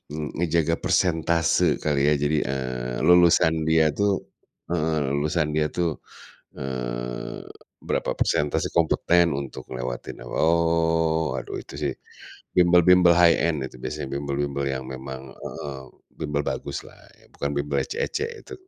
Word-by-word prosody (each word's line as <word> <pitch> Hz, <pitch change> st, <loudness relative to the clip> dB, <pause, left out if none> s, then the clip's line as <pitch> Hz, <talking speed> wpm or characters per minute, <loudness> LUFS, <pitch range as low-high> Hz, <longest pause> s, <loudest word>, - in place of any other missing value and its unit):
eee, 75 Hz, -2 st, -4 dB
ngejaga 85 Hz, -1 st, +1 dB
persentase 85 Hz, -1 st, +2 dB
kali 70 Hz, -2 st, +1 dB
ya. 75 Hz, -, +4 dB
Jadi, 75 Hz, +1 st, +1 dB
eee, 65 Hz, -2 st, -3 dB
lulusan 85 Hz, -2 st, +5 dB
dia 80 Hz, -1 st, +4 dB
tuh 100 Hz, +2 st, +2 dB, 0.6 s
heeh, 80 Hz, -2 st, 0 dB, 0.2 s
lulusan 75 Hz, +2 st, 0 dB
dia 75 Hz, -, +2 dB
tuh, 85 Hz, -3 st, -1 dB, 0.6 s
eee, -, -, -5 dB, 0.4 s
berapa -, -, -1 dB
persentase 75 Hz, 0 st, +1 dB
kompeten 85 Hz, +1 st, +3 dB
untuk 70 Hz, -2 st, -6 dB
ngelewatin, 60 Hz, -1 st, -5 dB
oh 80 Hz, 0 st, +2 dB
aduh -, -, -7 dB
itu -, -, -12 dB
sih -, -, -1 dB, 0.6 s
bimbel-bimbel 90 Hz, 0 st, +6 dB
high 85 Hz, -1 st, +6 dB
end 75 Hz, -5 st, -1 dB
itu, -, -, -14 dB
biasanya 65 Hz, -, -4 dB
bimbel-bimbel 70 Hz, 0 st, -2 dB
yang 65 Hz, -1 st, -2 dB
memang, 65 Hz, +1 st, -8 dB
eee, 70 Hz, -2 st, -7 dB, 0.4 s
bimbel 75 Hz, -1 st, -1 dB
bagus -, -, -4 dB
lah -, -, -16 dB, 0.2 s
ya, -, -, -21 dB
bukan 70 Hz, -, -3 dB
bimbel 70 Hz, 0 st, -1 dB
ecek-ecek 445 Hz, +2 st, -2 dB
itu. -, -, -9 dB
75 Hz, 130 wpm, -24 LUFS, 70-85 Hz, 0.6 s, bimbel-bimbel